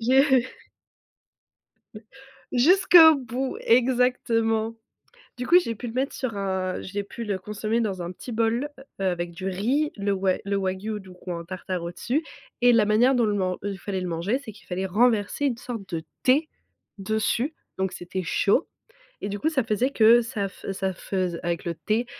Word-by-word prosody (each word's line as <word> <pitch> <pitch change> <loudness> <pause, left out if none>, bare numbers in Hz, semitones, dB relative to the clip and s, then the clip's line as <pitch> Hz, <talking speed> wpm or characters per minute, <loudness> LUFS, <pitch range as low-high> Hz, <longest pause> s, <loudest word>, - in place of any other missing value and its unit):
J'ai 260 +1 +4 2.1
Jusqu'au 320 +3 +7
bout 260 +1 -3
exactement. 230 -2 +2 0.6
Du 250 - -4
coup 350 - +7
j'ai 230 -10 -3
pu 240 +3 -7
le 225 - -6
mettre 265 +2 -1
sur 240 -5 -3
un 190 -1 -2
j'ai 200 +2 -4
pu 230 +3 -7
le 200 -3 -2
consommer 215 +3 -2
dans 195 -5 -2
un 175 - -4
petit 235 +7 -9
bol, 230 +5 0 0.3
heu, - - 0
avec 175 -1 -1
du 185 +3 -6
riz, 245 +11 0
le 200 0 -1
wa 190 -1 +1
le 200 0 -1
Wagyu 195 +3 -2
du 190 -1 -13
coup 180 0 -8
en 170 -1 -5
tartare 185 -1 -4
au-dessus 240 - -2 0.4
et 245 0 +6
la 220 -2 +4
manière 240 +5 +4
dont 240 - +3
le 210 - +1
man 185 -2 0
dont 205 - -2
il 190 - -7
fallait 190 -2 -3
le 180 - -3
manger 175 +10 -1
c'est 220 - -8
qu'il 210 - -19
fallait 185 +1 -2
renverser 220 +6 +2
une 245 -4 0
sorte 230 -6 -7
de 160 - -4 0.2
thé 290 +5 +3 0.5
dessus, 220 - -1 0.2
donc 190 -1 -1
c'était 180 +1 -5
chaud 200 - +2 0.5
et 205 - -3
du 205 - -4
coup 310 - 0
ça 270 -6 0
faisait 235 +5 0
que 230 +1 +6
ça 220 -4 -3
fe 195 - -7
ça 190 0 -1
feuse 180 -2 -3
avec 170 -1 -2
le 170 - -1
thé, 220 +8 -1
215 Hz, 185 wpm, -25 LUFS, 190-245 Hz, 2.1 s, Jusqu'au